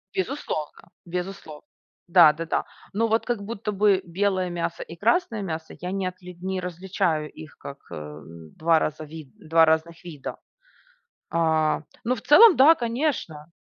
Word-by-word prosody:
Безусловно, 190 - -4 0.2
безусловно. 180 -3 -6 0.5
Да-да-да. 165 -2 +4 0.3
Но 225 +3 +1
вот 225 +1 +1
как 235 -5 -2
будто 210 0 -4
бы 200 -1 +3
белое 185 +1 0
мясо 170 -1 -3
и 165 - -11
красное 230 - +1
мясо 160 -3 -5
я 180 +1 -4
не 195 -1 -1
отли 180 0 -8
не 190 0 -2
различаю 175 -3 -2
их 155 -1 -12
как, 140 - -9
э, - - -5
н 75 +2 -10
2 165 0 +3
раза 155 0 -3
вид 155 -2 -10
2 165 +1 +4
разных 160 +2 0
вида. 155 -6 -7 0.9
А, 160 -2 +2 0.2
ну, 245 - +1
в 225 - -9
целом 375 - +8
да, 300 +5 +7
конечно. 230 - -3
175 Hz, 150 wpm, -25 LUFS, 160-200 Hz, 0.9 s, целом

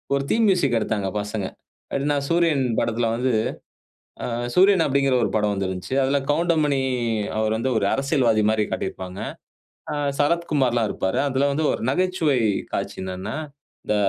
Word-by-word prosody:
ஒரு 140 - 0
theme 225 0 +3
music 145 -11 +2
எடுத்தாங்க 105 -3 -1
பசங்க. 105 -1 -4 0.5
எப்டின்னா 145 +1 +1
சூரியன் 165 -5 +2 0.2
படத்ல 115 +1 0
வந்து 125 +2 0 0.9
ஆ - - -1 0.3
சூரியன் 190 -1 +5
அப்டிங்கிற 135 -1 +2
ஒரு - - -1
படம் 105 -1 +2
வந்திருந்துச்சு. 95 +3 -3
அதுல 135 +2 +2
கவுண்டமணி 155 -3 +2 0.6
அவருவந்து 110 +3 0
ஒரு - - 0
அரசியல்வாதி 135 -6 +2
மாரி 110 -1 +1
காட்டியிருப்பாங்க. 95 0 -4 0.7
ஆ - - -2 0.3
சரத்குமார்லாம் 145 -7 +1
இருப்பாரு. 95 - -1
அதுல 135 +1 +1
வந்து 150 +3 -1
ஒரு - - -3
நகைச்சுவை 170 -2 +1 0.4
காட்சி - - -3
என்னன்னா, 95 +5 -5 0.5
இந்த 105 - +1
130 Hz, 135 wpm, -23 LUFS, 110-150 Hz, 0.9 s, சூரியன்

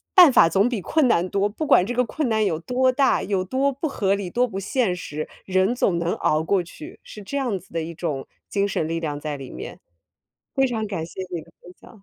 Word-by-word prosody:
“办 355 -7 +9
法 165 - +7
总 195 +7 +3
比 225 -6 -2
困 300 - +2
难 180 -4 +2
多”， 200 +1 +1
不 300 +8 -4
管 185 -10 +6
这 245 - -3
个 250 +1 +2
困 290 +4 -2
难 220 -1 +2
有 165 -5 0
多 255 +8 +1
大、 270 +1 +2
有 190 -2 -1
多 265 +8 +1
不 280 +4 -3
合 200 -7 +1
理、 195 -3 -4
多 250 +1 +2
不 195 -3 -5
现 200 -2 0
实， 155 -3 -5 0.2
人 190 +5 +2
总 175 -8 +1
能 170 +1 0
熬 155 +1 +1
过 185 +2 +1
去， 160 -2 -11
是 210 - -10
这 280 +8 -4
样 240 -9 -1
子 190 - -22
的 165 - -1
一 165 +1 -6
种 155 -5 -3 0.2
精 200 -1 +1
神 160 -5 -1
力 165 0 -2
量 145 -2 -3
在 150 -1 -4
里 135 -2 -9
面。 - - -8 0.8
非 270 0 +3
常 220 -3 -2
感 185 -6 -3
谢 190 - -9
你 165 - -2
的 - - -17
分 180 - -13
享， 215 -4 -16
195 Hz, 265 characters per minute, -23 LUFS, 170-250 Hz, 0.8 s, 办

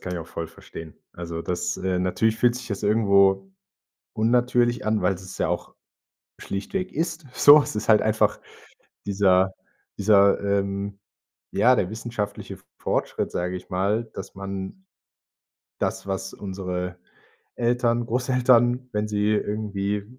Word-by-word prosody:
kann 90 - -5
ich 90 - -3
auch 80 - -7
voll 85 - -5
verstehen, 80 0 -11 0.2
also, 85 -1 -6
das 90 +1 -2
äh, 95 -1 -1
natürlich 110 +5 +1
fühlt 120 0 +3
sich 125 - -8
das 100 -1 -4
irgendwo 100 -2 +3 0.6
unnatürlich 120 +1 +2
an, 110 -2 +1
weil 90 +1 +2
es 95 +1 -10
ja - - +1
auch - - -3 0.6
schlichtweg 185 - -4
ist 160 0 -2
so. 145 +3 +8
Es - - -6
ist 105 - -4
halt 110 -2 +6
einfach 110 0 +1 0.7
dieser 95 -2 +3 0.5
dieser, 100 -1 +5
ähm 100 0 -2 0.5
ja, 125 +5 +4
der 95 -6 0
wissenschaftliche 110 -1 -5
F - - -21
Fortschritt, - - -2
sage 90 +1 -2
ich 90 0 -9
mal, 100 +5 0
dass 95 - -8
man 95 - -6 0.9
das, - - -2
was 95 0 -4
unsere 90 -2 -5 0.6
Eltern, 120 -1 +1
Großeltern, 125 0 +2
wenn 105 0 -1
sie 105 0 0
irgendwie 105 -1 -2
100 Hz, 140 wpm, -24 LUFS, 95-115 Hz, 0.9 s, so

